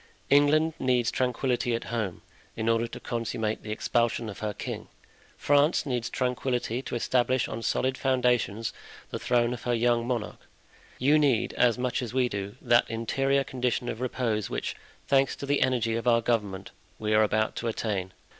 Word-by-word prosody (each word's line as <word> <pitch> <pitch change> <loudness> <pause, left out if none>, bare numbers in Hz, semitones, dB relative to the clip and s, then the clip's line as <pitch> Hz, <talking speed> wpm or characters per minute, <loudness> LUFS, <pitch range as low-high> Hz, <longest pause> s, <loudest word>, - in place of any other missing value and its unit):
England 150 +3 +4
needs 125 -3 +2
tranquillity 125 -1 0
at 115 - -4
home, 105 -7 -3 0.3
in 110 0 -3
order 115 0 +2
to - - -8
consummate 115 -2 -2
the 105 - -7
expulsion 115 +1 0
of 100 - -8
her 105 -1 -2
king; 100 - -6 0.5
France 145 +3 +3
needs 125 -4 -2
tranquillity 125 -1 -1
to 135 - -5
establish 125 +1 +1
on 115 - -5
solid 130 +3 0
foundations 125 -5 +1 0.4
the - - -3
throne 120 -1 +2
of 125 - -7
her 120 -1 0
young 120 0 +2
monarch. 120 -4 -3 0.6
You 145 +4 +4
need, 125 -5 +2
as 120 -2 +3
much 125 0 -1
as 125 0 -5
we 125 -2 +2
do, 100 0 -5
that 120 0 +4
interior 135 +5 +1
condition 125 -2 -2
of 110 - -5
repose 115 -5 -1
which, - - -3 0.3
thanks 135 -1 +3
to - - -6
the 145 0 +1
energy 120 -3 +1
of 115 +2 -3
our 115 -1 +5
government, 100 -5 -1 0.3
we 110 0 -1
are 105 - +5
about 110 0 +1
to 120 - -2
attain. 100 -5 -2
120 Hz, 175 wpm, -27 LUFS, 115-130 Hz, 0.6 s, our